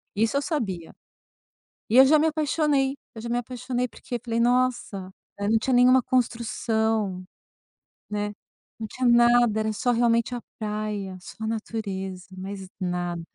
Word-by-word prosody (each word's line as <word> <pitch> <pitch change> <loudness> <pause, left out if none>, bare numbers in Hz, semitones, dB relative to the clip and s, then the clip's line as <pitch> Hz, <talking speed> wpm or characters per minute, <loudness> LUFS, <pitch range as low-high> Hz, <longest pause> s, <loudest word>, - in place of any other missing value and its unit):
isso 225 +6 +2
eu - - +1
sabia. 200 - -3 1.0
E 230 - +3
eu 265 - +10
já 305 +3 +6
me 310 +2 +3
apaixonei, 295 -3 +1 0.2
eu 225 - -8
já 235 - -6
me 240 - +1
apaixonei 250 +1 -2
porque 245 +1 -6
falei: 230 -1 -1
"Nossa". 245 -6 +1 0.3
É, 200 - -1
não 225 - +4
tinha 255 +4 0
nenhuma 250 +1 +6
construção, 220 -5 0 0.9
né, 210 0 -2 0.5
não 225 - -3
tinha 255 +4 -1
nada, 240 -2 +5
era 215 0 0
só 245 +4 +1
realmente 235 0 +2
a 240 - -5 0.2
praia, 210 -3 -3
só 200 +4 -10
a - - -1
natureza, 195 -4 -4
mais 195 0 -6
nada. 175 -2 -2
230 Hz, 155 wpm, -25 LUFS, 205-250 Hz, 1.0 s, eu